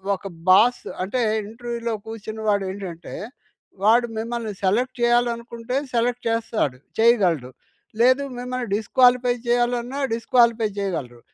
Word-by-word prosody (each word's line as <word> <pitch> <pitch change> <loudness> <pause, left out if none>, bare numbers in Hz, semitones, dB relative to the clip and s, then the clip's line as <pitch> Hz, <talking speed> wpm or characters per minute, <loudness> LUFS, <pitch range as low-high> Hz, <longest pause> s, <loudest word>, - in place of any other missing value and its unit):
ఒక 190 - -15 0.2
బాస్ 225 +6 +5 0.2
అంటే, 240 +7 -1 0.3
ఇంటర్‌వ్యూలో 235 0 -4
కూర్చున్న 220 0 -7
వాడు 200 -1 +2
ఏంటంటే, 180 -4 -8 0.7
వాడు 235 +3 +5
మిమ్మల్ని 230 0 -3
సెలెక్ట్ 240 +7 +1
చెయ్యాలనుకుంటే 240 0 0 0.2
సెలెక్ట్ 240 +1 0
చేస్తాడు, 225 - -1 0.2
చెయ్యగలడు. 185 - +3 0.5
లేదు 255 +3 +5 0.2
మిమ్మల్ని 250 0 -4
డిస్‌క్వాలిఫై 245 +3 +3
చెయ్యాలన్నా, 245 +2 0
డిస్‌క్వాలిఫై 230 -1 +3
చెయ్యగలరు, 150 -12 -4
235 Hz, 105 wpm, -23 LUFS, 210-245 Hz, 0.7 s, బాస్